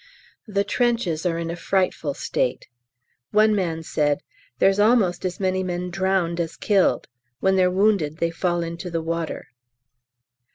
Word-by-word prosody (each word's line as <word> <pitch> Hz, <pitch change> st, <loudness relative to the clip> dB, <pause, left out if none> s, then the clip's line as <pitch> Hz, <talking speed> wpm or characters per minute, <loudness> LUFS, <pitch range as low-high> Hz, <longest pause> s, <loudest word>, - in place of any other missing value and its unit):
The 200 Hz, -1 st, 0 dB
trenches 215 Hz, -10 st, 0 dB
are 165 Hz, -1 st, -1 dB
in 165 Hz, 0 st, -3 dB
a -, -, -4 dB
frightful 175 Hz, -5 st, -1 dB
state. 125 Hz, -, -2 dB, 0.6 s
One 215 Hz, +1 st, +4 dB
man 165 Hz, -5 st, -1 dB
said, 145 Hz, -2 st, 0 dB, 0.3 s
"There's 195 Hz, +7 st, +3 dB
almost 210 Hz, -5 st, +3 dB
as 185 Hz, -, -3 dB
many 185 Hz, -1 st, 0 dB
men 180 Hz, -1 st, -3 dB
drowned 185 Hz, -2 st, 0 dB
as 165 Hz, -1 st, -3 dB
killed: 190 Hz, -, +2 dB, 0.3 s
when 190 Hz, +4 st, +2 dB
they're 185 Hz, -1 st, +4 dB
wounded 185 Hz, -5 st, +1 dB
they 170 Hz, 0 st, 0 dB
fall 175 Hz, 0 st, -1 dB
into 170 Hz, +2 st, -5 dB
the 165 Hz, -1 st, -2 dB
water." 165 Hz, 0 st, -4 dB
180 Hz, 150 wpm, -23 LUFS, 165-195 Hz, 0.6 s, One